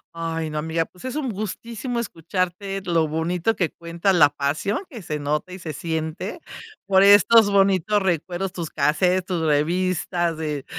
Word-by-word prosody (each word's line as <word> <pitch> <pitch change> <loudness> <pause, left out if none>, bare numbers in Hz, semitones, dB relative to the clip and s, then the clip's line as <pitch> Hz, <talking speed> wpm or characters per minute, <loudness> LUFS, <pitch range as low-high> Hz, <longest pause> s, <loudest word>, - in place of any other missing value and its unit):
Ay, 165 -1 -3
no, 150 - -2
amiga, 160 +1 -1
pues 180 +8 -15
es 255 +1 -4
un 280 -5 -2
gustísimo 230 +4 -4
escucharte 185 0 -3
lo 165 -3 +2
bonito 170 +7 -1
que 175 -5 -1
cuenta, 170 +3 -1
la 155 -5 +6
pasión 145 - -2
que 240 -9 -9
se 155 -4 -4
nota 150 +4 -2
y - - -6
se 165 -4 -6
siente 160 - -4 0.5
por 190 -1 +4
estos 205 +2 +7
bonitos 195 +1 +3
recuerdos, 180 +1 -1
tus 170 -4 -5
casetes, 180 +5 +1
tus 180 -4 -2
revistas 170 +2 0
de 150 -3 -4
175 Hz, 160 wpm, -23 LUFS, 160-195 Hz, 0.5 s, estos